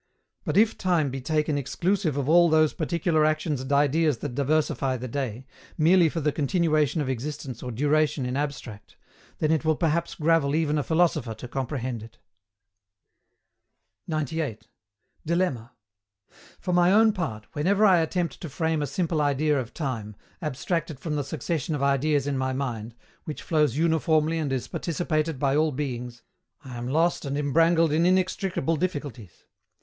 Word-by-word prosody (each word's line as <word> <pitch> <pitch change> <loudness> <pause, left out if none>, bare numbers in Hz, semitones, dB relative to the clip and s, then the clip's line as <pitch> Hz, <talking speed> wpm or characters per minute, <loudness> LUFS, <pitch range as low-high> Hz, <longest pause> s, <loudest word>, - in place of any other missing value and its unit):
But - - -1
if 220 +1 +3
time 170 -7 +1
be 135 0 -5
taken 150 +1 0
exclusive 170 +2 -1
of 140 -2 -1
all 170 +2 +6
those 155 -1 +3
particular 165 -1 0
actions 155 -2 0
and 130 +2 -6
ideas 145 0 +3
that 130 +2 -5
diversify 140 -1 0
the 125 +1 -6
day, 130 -1 -4 0.3
merely 170 +1 +5
for 165 - -3
the 150 -1 +1
continuation 155 0 +1
of 140 - -2
existence 130 -1 -5
or 125 - -5
duration 145 +2 +1
in 125 +1 -2
abstract, 135 -7 -5 0.4
then 155 - +1
it 160 -1 +1
will 155 0 +2
perhaps 170 +1 0
gravel 155 -3 +2
even 155 -2 +1
a - - -1
philosopher 160 -9 +1
to 110 - -8
comprehend 130 -2 -3
it. 115 +2 -13 1.9
98. 150 -8 -3 0.5
DILEMMA. 155 -9 -1 0.9
For 180 - -2
my 175 +1 +4
own 220 +1 +5
part, 140 - -4
whenever 195 +8 +2
I 185 -4 +6
attempt 165 -2 -2
to 165 - -5
frame 160 +2 -1
a 145 - -1
simple 160 +2 -1
idea 145 0 +1
of 125 -2 -5
time, 115 -9 -4 0.3
abstracted 155 0 -3
from 155 -1 -3
the 145 - -1
succession 155 +1 -3
of 140 - -2
ideas 140 +1 +2
in 140 -2 -1
my 130 0 -1
mind, 120 -4 -4 0.3
which 155 - -6
flows 150 -5 +1
uniformly 160 0 +2
and 150 -4 -2
is 130 -2 -2
participated 160 -2 -2
by 135 +1 +1
all 155 +1 +2
beings, 125 -4 -5 0.4
I 130 -2 -8
am 120 0 -5
lost 165 +6 +1
and 140 -1 -3
embrangled 165 +3 +3
in 165 +3 +3
inextricable 185 -3 0
difficulties. 140 - -5
150 Hz, 160 wpm, -26 LUFS, 135-165 Hz, 1.9 s, all